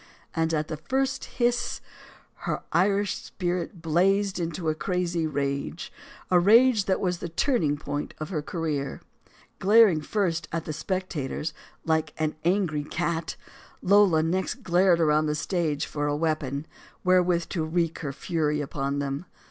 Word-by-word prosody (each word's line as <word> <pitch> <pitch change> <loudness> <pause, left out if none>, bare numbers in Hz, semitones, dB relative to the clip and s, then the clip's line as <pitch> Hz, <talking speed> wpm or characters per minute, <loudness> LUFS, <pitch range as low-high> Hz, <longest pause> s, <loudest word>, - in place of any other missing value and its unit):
And 160 0 +1
at 155 -1 0
the 155 - -4
first 265 - -1
hiss, 240 -1 0 0.7
her - - -2
Irish 200 +3 +2
spirit 175 -1 -4
blazed 190 +4 +2
into 165 0 -3
a 155 - +3
crazy 170 0 -1
rage; 140 +2 -3 0.4
a 180 - +6
rage 220 +3 +5
that 190 - +1
was 180 -2 -1
the 170 - -5
turning 165 - +1
point 145 0 -4
of 155 - -5
her 160 -6 -2
career. 150 -3 -3 0.6
Glaring 200 -5 +6
first 170 -1 -1
at 165 -1 -3
the 155 - -4
spectators 160 -4 -3 0.3
like 160 -1 0
an 155 -1 -1
angry 170 -4 +1
cat, 165 +2 -2 0.5
Lola 190 -5 +5
next 180 +3 -1
glared 175 0 +4
around 155 -1 +3
the 150 - 0
stage 155 -2 -1
for 145 -1 -2
a 145 - 0
weapon 155 -3 -1 0.4
where 185 0 +5
with 175 -1 0
to 165 - -1
wreak 165 +1 -1
her 145 -3 -3
fury 150 0 -1
upon 140 -1 -2
them. 140 +4 -3
165 Hz, 150 wpm, -26 LUFS, 150-185 Hz, 0.7 s, a